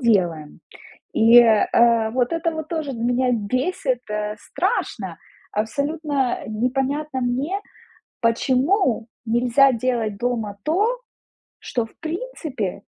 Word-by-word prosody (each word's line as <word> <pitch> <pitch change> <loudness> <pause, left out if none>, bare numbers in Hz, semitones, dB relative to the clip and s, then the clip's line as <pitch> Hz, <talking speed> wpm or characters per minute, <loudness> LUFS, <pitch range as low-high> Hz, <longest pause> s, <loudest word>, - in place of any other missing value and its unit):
делаем, 175 - +1 0.5
и, 230 +2 +7
э, 230 0 +4
вот 250 +1 0
это 335 0 0
вот 315 -1 -5
тоже 315 -4 -3
меня 245 +2 +1
бесит, 255 - -1
э, 210 0 -2
страшно. 375 - -2 0.3
Абсолютно 280 +4 -1
непонятно 265 +5 -1
мне, 265 +11 -1 0.6
почему 255 - +2 0.2
нельзя 245 +4 +4
делать 230 -4 -1
дома 225 -5 -2
то, 420 +10 +1 0.6
что, 240 -2 -2
в 225 - -19
принципе, 315 - -4
250 Hz, 100 wpm, -22 LUFS, 225-300 Hz, 0.6 s, и